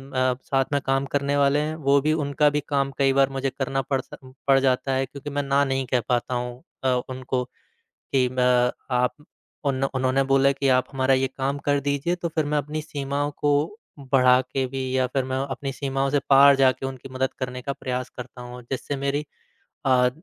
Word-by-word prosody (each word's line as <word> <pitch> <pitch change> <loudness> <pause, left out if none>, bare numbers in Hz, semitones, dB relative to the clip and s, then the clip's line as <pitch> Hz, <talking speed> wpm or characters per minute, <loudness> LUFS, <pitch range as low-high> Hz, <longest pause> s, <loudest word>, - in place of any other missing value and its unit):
अ, 130 0 +1
साथ 135 -1 +1
में 140 - +3
काम 135 0 +1
करने 145 0 0
वाले 140 +1 +3
हैं, 155 +1 -2
वो 140 -2 +3
भी 155 +2 +2
उनका 150 -1 +2
भी 150 - +3
काम 140 -1 +1
कई 135 -1 +3
बार 135 0 +4
मुझे 135 0 -2
करना 135 0 -2
पड़ 135 0 -1
सा - - -12 0.3
पड़ 135 -1 +6
जाता 135 0 +1
है 135 0 +1
क्योंकि 140 +2 -8
मैं 145 0 -2
ना 140 +1 +2
नहीं 135 -1 -1
कह 125 - +3
पाता 125 +1 0
हूँ 125 0 -4 0.2
अ, 130 - +1 0.2
उनको 130 0 -2 0.7
कि 130 -2 +4
अ, 125 -1 +3 0.2
आप 125 0 +2 0.5
उन 135 -1 0
उन्होंने 130 0 +1
बोला 135 0 +4
कि 140 0 -1
आप 130 - +3
हमारा 135 0 +2
ये 130 0 +2
काम 140 +1 -1
कर 145 0 +1
दीजिए, 145 +5 0
तो 175 -1 -3
फिर 160 -1 -1
मैं 150 +1 0
अपनी 150 +2 -3
सीमाओं 145 0 -2
को 145 -1 +2 0.5
बढ़ा 130 -2 +4
के 130 +1 -2
भी 130 +1 -4
या 130 -1 +2
फिर 130 +1 -1
मैं 130 - 0
अपनी 135 +1 -4
सीमाओं 135 0 -1
से 145 - +2
पार 140 0 +8
जाक़े 135 0 +2
उनकी 130 0 -9
मदद 130 0 0
करने 125 -1 -4
का 140 - -2
प्रयास 130 -2 -4
करता 125 0 -9
हूँ 125 0 -9
और 125 - -10
जिससे 135 +2 -3
मेरी 140 +2 -1 0.6
अ, 125 -1 +4
135 Hz, 210 wpm, -24 LUFS, 130-140 Hz, 0.7 s, पार